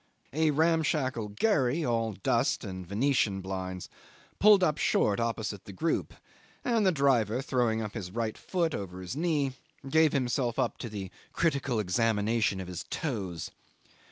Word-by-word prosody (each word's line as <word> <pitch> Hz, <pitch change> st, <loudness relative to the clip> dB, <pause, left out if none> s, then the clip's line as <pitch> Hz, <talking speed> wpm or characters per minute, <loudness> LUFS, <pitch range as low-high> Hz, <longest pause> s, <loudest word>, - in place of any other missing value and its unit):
A 160 Hz, +1 st, +3 dB
ramshackle 150 Hz, -6 st, +1 dB
gharry, 155 Hz, -, +2 dB
all 115 Hz, -2 st, 0 dB
dust 95 Hz, -, +1 dB
and 95 Hz, -1 st, -6 dB
venetian 105 Hz, -1 st, +1 dB
blinds, 95 Hz, -1 st, -5 dB, 0.5 s
pulled 205 Hz, -2 st, +7 dB
up 155 Hz, -4 st, +2 dB
short 100 Hz, +1 st, +2 dB
opposite 110 Hz, -4 st, -2 dB
the -, -, -8 dB
group, 165 Hz, -, -1 dB, 0.5 s
and 230 Hz, -5 st, +2 dB
the -, -, +5 dB
driver, 130 Hz, -, +2 dB
throwing 120 Hz, -4 st, 0 dB
up 105 Hz, -, -5 dB
his 100 Hz, -6 st, -5 dB
right 110 Hz, +2 st, -2 dB
foot 170 Hz, -4 st, -1 dB
over 95 Hz, -2 st, -5 dB
his 90 Hz, +6 st, -5 dB
knee, 150 Hz, -4 st, +1 dB, 0.4 s
gave 160 Hz, +1 st, +4 dB
himself 125 Hz, -2 st, 0 dB
up 130 Hz, -3 st, 0 dB
to 120 Hz, -, -5 dB
the 100 Hz, -3 st, -6 dB, 0.2 s
critical 140 Hz, -7 st, +1 dB
examination 105 Hz, 0 st, +1 dB
of 95 Hz, -, -5 dB
his 90 Hz, -1 st, -5 dB
toes. 95 Hz, -, -3 dB
120 Hz, 150 wpm, -29 LUFS, 100-150 Hz, 0.5 s, pulled